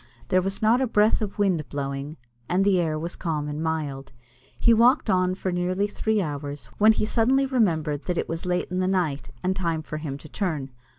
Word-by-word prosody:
There 185 Hz, -, +4 dB
was 195 Hz, +3 st, -3 dB
not 230 Hz, +4 st, +4 dB
a 260 Hz, -, +2 dB
breath 215 Hz, -1 st, +3 dB
of 205 Hz, -2 st, -4 dB
wind 185 Hz, -7 st, +1 dB
blowing, 140 Hz, +1 st, -4 dB, 0.3 s
and 185 Hz, +2 st, +2 dB
the 190 Hz, -3 st, +4 dB
air 155 Hz, -2 st, -1 dB
was 170 Hz, +3 st, -4 dB
calm 155 Hz, -4 st, -2 dB
and 150 Hz, +1 st, -4 dB
mild. 145 Hz, -4 st, -3 dB, 0.5 s
He 235 Hz, -, +5 dB
walked 235 Hz, 0 st, +4 dB
on 185 Hz, 0 st, +2 dB
for 185 Hz, 0 st, -3 dB
nearly 180 Hz, +3 st, 0 dB
three 210 Hz, 0 st, 0 dB
hours, 145 Hz, -4 st, -6 dB
when 215 Hz, +1 st, +7 dB
he 215 Hz, -, 0 dB
suddenly 255 Hz, +5 st, +2 dB
remembered 165 Hz, -, 0 dB
that 180 Hz, -1 st, -2 dB
it -, -, -1 dB
was 165 Hz, 0 st, -4 dB
late 180 Hz, 0 st, -1 dB
in 180 Hz, -, -1 dB
the 185 Hz, -, +1 dB
night, 160 Hz, -, -1 dB
and 185 Hz, +1 st, +1 dB
time 165 Hz, -4 st, -1 dB
for 155 Hz, -, -5 dB
him 150 Hz, -3 st, -5 dB
to 150 Hz, -, -12 dB
turn. 155 Hz, -7 st, -3 dB
180 Hz, 215 wpm, -25 LUFS, 150-205 Hz, 0.5 s, when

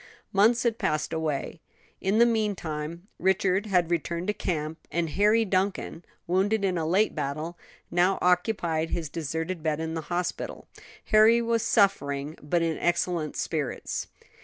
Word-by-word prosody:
Months 220 Hz, +5 st, +4 dB
had 235 Hz, -2 st, 0 dB
passed 155 Hz, +1 st, -1 dB
away. 155 Hz, -3 st, -2 dB, 0.4 s
In 195 Hz, +3 st, +1 dB
the 235 Hz, -, +7 dB
meantime 175 Hz, -7 st, -2 dB
Richard 190 Hz, +2 st, +2 dB
had 180 Hz, -4 st, +2 dB
returned 170 Hz, +1 st, -1 dB
to -, -, +2 dB
camp, 160 Hz, -5 st, -3 dB
and 170 Hz, -2 st, -1 dB
Harry 210 Hz, +6 st, +3 dB
Duncan, 185 Hz, -3 st, -1 dB, 0.2 s
wounded 200 Hz, +4 st, +1 dB
in 185 Hz, -2 st, +1 dB
a 160 Hz, -2 st, -1 dB
late 195 Hz, +6 st, +2 dB
battle, 155 Hz, +5 st, -3 dB, 0.4 s
now 180 Hz, +2 st, +3 dB
occupied 180 Hz, -3 st, +1 dB
his 165 Hz, -3 st, -3 dB
deserted 165 Hz, +3 st, -3 dB
bed 155 Hz, -1 st, -1 dB
in 160 Hz, 0 st, -3 dB
the 165 Hz, -, -3 dB
hospital. 175 Hz, 0 st, -3 dB, 0.4 s
Harry 220 Hz, +2 st, +7 dB
was 230 Hz, -1 st, +1 dB
suffering, 150 Hz, -, +1 dB
but 165 Hz, +3 st, 0 dB
in 165 Hz, -2 st, -1 dB
excellent 175 Hz, -2 st, 0 dB
spirits. 150 Hz, -5 st, -3 dB
175 Hz, 145 wpm, -27 LUFS, 160-200 Hz, 0.4 s, the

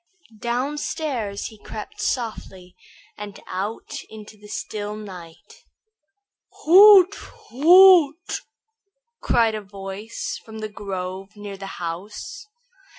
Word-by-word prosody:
Downstairs 250 Hz, -3 st, -3 dB
he 220 Hz, -, -16 dB
crept 215 Hz, 0 st, -8 dB
softly 195 Hz, -7 st, -4 dB, 0.4 s
and 205 Hz, -1 st, -8 dB
out 200 Hz, +5 st, -5 dB
into 215 Hz, -1 st, -11 dB
the 210 Hz, 0 st, -16 dB
still 210 Hz, 0 st, -5 dB
night. 180 Hz, -6 st, -12 dB, 1.0 s
"Hoot! 385 Hz, +2 st, +8 dB, 0.4 s
hoot!" 340 Hz, +2 st, +6 dB, 0.8 s
cried 230 Hz, -2 st, +2 dB
a 215 Hz, -, -4 dB
voice 200 Hz, +2 st, -7 dB
from 220 Hz, -1 st, -11 dB
the 215 Hz, 0 st, -5 dB
grove 195 Hz, -1 st, -6 dB
near 205 Hz, -1 st, -8 dB
the 195 Hz, 0 st, -8 dB
house. 190 Hz, -, -7 dB
215 Hz, 95 wpm, -23 LUFS, 195-265 Hz, 1.0 s, Hoot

